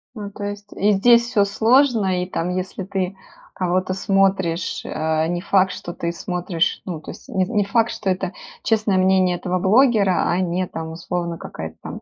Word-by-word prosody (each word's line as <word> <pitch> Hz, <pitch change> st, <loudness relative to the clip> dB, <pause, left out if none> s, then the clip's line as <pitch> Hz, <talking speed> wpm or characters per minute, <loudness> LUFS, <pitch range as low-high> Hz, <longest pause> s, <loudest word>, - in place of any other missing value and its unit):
Ну, 205 Hz, -2 st, -6 dB
то 205 Hz, -, -8 dB
есть 205 Hz, 0 st, -6 dB
и 205 Hz, +2 st, +3 dB
здесь 235 Hz, +4 st, +5 dB
всё 205 Hz, -5 st, +3 dB
сложно, 220 Hz, -3 st, +3 dB
и -, -, -3 dB
там, 170 Hz, -1 st, -2 dB
если 185 Hz, +1 st, -3 dB
ты 190 Hz, 0 st, -3 dB, 0.4 s
кого-то 185 Hz, +1 st, 0 dB
смотришь, 190 Hz, -3 st, +1 dB
э, 160 Hz, 0 st, 0 dB
не 175 Hz, +1 st, -2 dB
факт, 190 Hz, -1 st, +3 dB
что 175 Hz, -, -7 dB
ты 170 Hz, 0 st, -3 dB
смотришь, 175 Hz, 0 st, -2 dB
ну, 175 Hz, -4 st, -4 dB
то -, -, -8 dB
есть -, -, -14 dB
не 190 Hz, -1 st, +1 dB
не 210 Hz, 0 st, +1 dB
факт, 225 Hz, +3 st, +2 dB
что 200 Hz, -, -3 dB
это 185 Hz, 0 st, -1 dB, 0.3 s
честное 215 Hz, -3 st, +2 dB
мнение 185 Hz, -1 st, +3 dB
этого 185 Hz, 0 st, -2 dB
блогера, 205 Hz, -1 st, +3 dB
а 175 Hz, -, +1 dB
не 185 Hz, 0 st, 0 dB
там, 160 Hz, -1 st, -6 dB
условно, 170 Hz, 0 st, -4 dB
какая-то 80 Hz, -, -8 dB
там -, -, -7 dB
185 Hz, 185 wpm, -21 LUFS, 175-205 Hz, 0.4 s, здесь